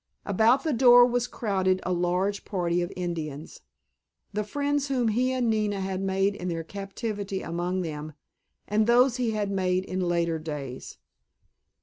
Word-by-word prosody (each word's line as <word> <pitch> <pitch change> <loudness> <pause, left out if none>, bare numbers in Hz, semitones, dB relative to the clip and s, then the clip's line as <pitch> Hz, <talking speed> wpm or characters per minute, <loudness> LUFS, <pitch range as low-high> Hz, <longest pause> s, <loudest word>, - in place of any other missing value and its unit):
About 225 +7 +3
the 315 - 0
door 245 0 +7
was 245 0 0
crowded 190 -5 0
a 185 - -1
large 180 +3 0
party 175 -3 -1
of 175 +2 -3
Indians, 160 -4 -5 0.7
the 210 +1 -1
friends 285 +5 -1
whom 250 -4 +1
he 250 +4 +1
and 255 -2 0
Nina 210 -2 0
had 190 0 -3
made 195 +1 +1
in 180 -2 -6
their 165 -2 -2
captivity 200 +1 -5
among 175 +2 -2
them, 155 -1 -6 0.5
and 215 +1 +2
those 245 +1 +4
he 245 -2 0
had 210 -2 -1
made 185 -1 0
in 185 - -4
later 170 -2 0
days. 145 -5 -7
195 Hz, 155 wpm, -27 LUFS, 175-230 Hz, 0.7 s, door